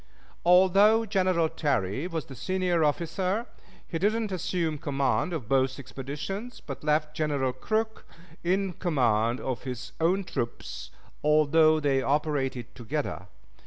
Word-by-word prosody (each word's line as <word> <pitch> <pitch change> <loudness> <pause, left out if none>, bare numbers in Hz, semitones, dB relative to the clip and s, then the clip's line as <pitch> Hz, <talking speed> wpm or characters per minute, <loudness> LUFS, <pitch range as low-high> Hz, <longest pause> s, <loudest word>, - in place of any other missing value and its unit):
Although 195 +5 +5
General 185 -5 +2
Terry 140 - -1
was 165 -4 -4
the 135 - -10
senior 180 +5 0
officer, 180 +8 0 0.4
he 165 - -3
did 205 +5 +3
not 225 -3 -2
assume 170 -3 -1
command 140 +5 0
of 150 -10 -4
both 130 +1 +2
expeditions, 150 - -6
but 140 0 -8
left 150 0 +1
General 140 -5 0
Crook 220 - -2 0.4
in 190 +2 +1
command 120 - +1
of 130 -2 -3
his 125 -1 -6
own 185 +4 +2
troops, 65 - -5 0.3
although 155 +1 +5
they 140 -3 +2
operated 140 -3 -1
together. 120 - -4
155 Hz, 125 wpm, -28 LUFS, 135-185 Hz, 0.4 s, Although